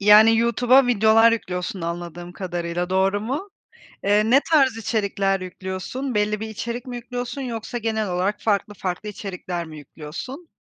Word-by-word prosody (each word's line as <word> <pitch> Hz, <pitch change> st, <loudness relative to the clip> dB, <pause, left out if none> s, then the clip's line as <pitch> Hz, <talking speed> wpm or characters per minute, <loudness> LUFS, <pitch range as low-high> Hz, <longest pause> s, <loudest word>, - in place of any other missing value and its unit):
Yani, 210 Hz, +2 st, +8 dB
YouTube'a 245 Hz, +3 st, +4 dB
videolar 225 Hz, 0 st, +5 dB
yüklüyorsun 185 Hz, -1 st, -3 dB
anladığım 175 Hz, +1 st, -5 dB
kadarıyla 175 Hz, -1 st, -3 dB
doğru 190 Hz, +2 st, +2 dB
mu? 275 Hz, -, -3 dB, 0.6 s
Eee, 210 Hz, +2 st, +3 dB
ne 270 Hz, +3 st, +7 dB
tarz 270 Hz, -6 st, +5 dB
içerikler 200 Hz, -3 st, 0 dB
yüklüyorsun? 190 Hz, +8 st, -5 dB
Belli 210 Hz, 0 st, +1 dB
bir 220 Hz, -, -4 dB
içerik 235 Hz, +3 st, -5 dB
mi 250 Hz, -1 st, -5 dB
yüklüyorsun 245 Hz, +2 st, -5 dB
yoksa 240 Hz, -1 st, -4 dB
genel 220 Hz, -3 st, -1 dB
olarak 185 Hz, +4 st, -1 dB
farklı 210 Hz, -1 st, 0 dB
farklı 190 Hz, +1 st, -4 dB
içerikler 180 Hz, -4 st, -5 dB
mi 155 Hz, -1 st, -10 dB
yüklüyorsun? 165 Hz, -, -8 dB
210 Hz, 145 wpm, -23 LUFS, 185-235 Hz, 0.6 s, Yani